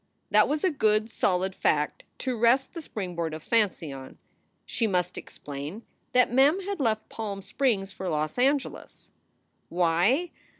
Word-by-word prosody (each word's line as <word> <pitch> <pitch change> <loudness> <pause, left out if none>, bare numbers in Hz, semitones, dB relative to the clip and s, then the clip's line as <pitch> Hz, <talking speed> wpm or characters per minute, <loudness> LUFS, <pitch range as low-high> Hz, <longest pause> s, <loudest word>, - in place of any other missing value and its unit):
That - - +5
was 300 +1 -1
a 375 - +3
good, 215 -5 +2
solid 190 0 +1
fact 150 -4 0
to 255 -1 -2
rest 240 +4 +3
the 335 - -6
springboard 175 - -4
of 155 - -9
fancy 200 -10 0
on. 130 -1 -10 0.5
She 230 - 0
must 180 -2 0
explain 145 +10 -7 0.3
that 250 -1 +4
Mem 280 +8 +5
had 395 -1 -4
left 220 -5 0
Palm 200 -3 -5
Springs 205 -8 0
for 190 -1 -5
Los 155 +6 -2
Angeles. 275 +2 -1 0.6
Why? 180 - +2
215 Hz, 145 wpm, -27 LUFS, 175-260 Hz, 0.6 s, That